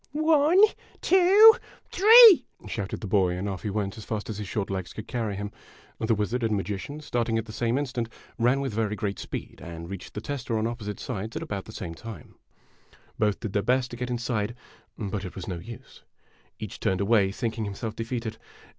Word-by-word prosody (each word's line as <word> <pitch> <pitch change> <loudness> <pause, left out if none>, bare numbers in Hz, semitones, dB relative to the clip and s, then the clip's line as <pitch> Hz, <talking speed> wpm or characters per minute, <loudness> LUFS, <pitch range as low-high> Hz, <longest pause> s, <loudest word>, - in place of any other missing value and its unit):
" - - -47
One 310 +3 +4 0.4
two 390 +4 +8 0.4
three! 440 0 +9
" - - -16
shouted 100 -3 -4
the - - -5
boy, 95 -3 +2
and 95 +3 -3
off 95 -2 -4
he 105 - -3
went 100 +1 -3
as - - -8
fast 110 +1 -4
as 105 - -6
his 105 - -5
short 100 0 -3
legs 95 -2 -4
could 110 - -8
carry 110 -5 -2
him. 100 +1 -5 0.5
The 110 0 +1
wizard 105 +4 -1
and 110 -2 +1
magician, 105 +10 -5
start 120 -5 -1
ing 115 - +1
at 110 - -2
the 110 - -9
same 120 +3 0
instant, 125 -5 -2 0.3
ran 125 +4 +3
with 135 -5 -3
very 105 -1 -1
great 100 -1 -3
speed, - - -7
and 85 +1 -8
reached 95 -2 -8
the - - -2
tester 120 -4 -3
on 110 - 0
opposite 110 -3 -4
sides 110 +3 -5
at - - -3
about 100 -2 -5
the - - -10
same 90 -6 -6
time. 115 +5 -10 0.9
Both 105 -2 +1
clicl 110 - -4
their 100 - +2
best 125 +2 +1
to - - -6
get 125 +1 -4
inside; 120 -2 -2 0.4
but 100 -2 -4
it 90 - -7
was 95 - -7
no 90 -3 -4
use. 115 +6 -11 0.6
Each - - -7
turned 95 -1 0
away, 100 -1 +3
thinking 110 0 -3
himself 105 +2 -5
defeated. 115 -1 -4
110 Hz, 210 wpm, -26 LUFS, 100-120 Hz, 0.9 s, three